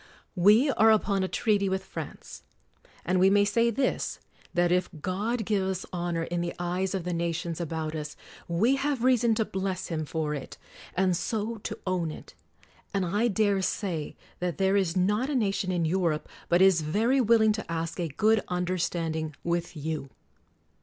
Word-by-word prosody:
We 210 +10 +5
are 220 -3 +4
upoa 205 -3 +3
a - - 0
treaty 200 -1 +1
with 190 0 -1
France. - - -8 0.6
And 185 0 +2
we 190 +1 +6
may 205 +1 +4
say 230 +3 +2
this, 260 +4 -1 0.3
that 175 0 +2
if 180 0 +2
God 210 +7 -2
give 205 -2 +1
us 190 -1 -2
honor 175 -1 -1
in 170 +1 -2
the 170 0 -3
eyes 180 +2 -1
of 190 - -2
the 180 0 -2
nations 170 0 -2
about 160 -1 -3
us, 150 -1 -5 0.3
we 220 +11 +2
have 275 -3 -1
reason 240 -3 +4
to 220 - +1
bless 190 -1 -3
Him: 160 -2 -2
for 155 0 -2
it, 140 -3 -7 0.4
and 185 -1 +2
so 220 +4 -2
to 205 - -6
own 180 -3 0
it. 155 - -10 0.6
And 195 -2 +1
I 205 +7 +1
dare 205 -2 +2
say 180 -5 -2 0.2
that 180 -2 -2
there 195 0 +2
is 190 -3 +1
not 210 +8 +1
a 295 - -1
nation 195 -5 0
in 175 -2 0
Europe 165 -3 0 0.2
but 175 +2 +5
is 190 -4 +5
very 225 - +2
will 230 -1 +4
ing 215 - +5
to 215 -5 -4
ask 165 +1 -3
a 170 - 0
good 210 +9 +2
understanding 170 -3 -2
with 170 -1 -2
you. 150 -2 -4
185 Hz, 180 wpm, -28 LUFS, 170-210 Hz, 0.6 s, we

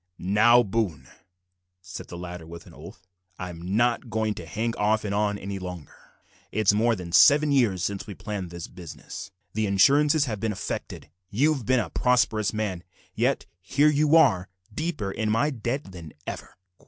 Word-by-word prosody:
"Now, 110 +6 +5
Boone," 95 - -2 0.7
said 90 0 -9
the 85 - -8
latter, 90 -2 -8
with 85 0 -10
an - - -15
oath, 95 - -13 0.3
"I'm 90 +1 -5
not 120 +1 +1
goin' 110 0 0
to - - -9
hang 115 +2 -2
off 105 +1 +1
and 100 - -2
on 105 0 0
any 100 0 -5
longer. 90 -4 -8 0.6
It's 105 -2 +3
more 115 +2 +2
than 90 -4 -8
seven 150 - +6
years 110 -10 +2
since 100 0 -3
we 100 - -7
planned 100 -5 -5
this 85 -1 -7
business, 90 +1 -9 0.2
the 110 0 0
insurances 140 +9 +4
have 110 -6 -4
been 110 0 -1
effected, 95 - -6 0.2
you've 135 +1 +1
bin 130 -1 +4
a 110 - -3
prosperous 115 -4 +2
man, 105 -5 -3 0.3
yet - - 0 0.2
here 140 +11 +3
you 150 +1 +3
are, 100 - +4 0.2
deeper 155 - -3
in 110 +2 -2
my 115 +8 +2
debt 120 -1 -4
than 85 -4 -10
ever." - - -7
105 Hz, 170 wpm, -26 LUFS, 95-120 Hz, 0.7 s, seven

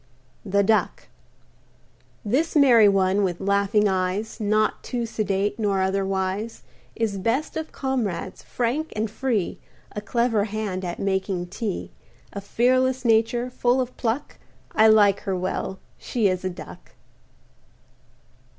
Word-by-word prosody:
THE 200 0 +2
DUCK 215 +1 0 1.2
This 280 +12 0
merry 240 -8 +7
one, 195 0 +2
with 175 -3 -1
laughing 200 +1 +2
eyes, 190 +4 -1
Not 215 0 +1
too 240 -2 -3
sedate 205 -2 -1
nor 205 -3 +1
overwise, 195 +2 -2 0.3
Is 215 -4 -1
best 235 +10 -1
of 320 0 -4
comrades; 255 -9 -3
frank 255 +7 -2
and 215 0 -2
free, 225 -5 -1 0.3
A 210 - -5
clever 230 -1 +1
hand 205 -3 -3
at 175 -1 -4
making 190 -2 -1
tea; 200 +1 -4 0.4
A 200 - -5
fearless 255 +4 +1
nature, 230 +2 +2
full 245 +1 +1
of 255 -1 -3
pluck, 235 +3 -3 0.3
I 220 - +5
like 205 -2 +5
her 195 - -3
well 185 +1 -3 0.2
she 230 -5 0
is 185 -1 -1
a 185 - -1
Duck. 175 - -11
210 Hz, 130 wpm, -24 LUFS, 195-235 Hz, 1.2 s, merry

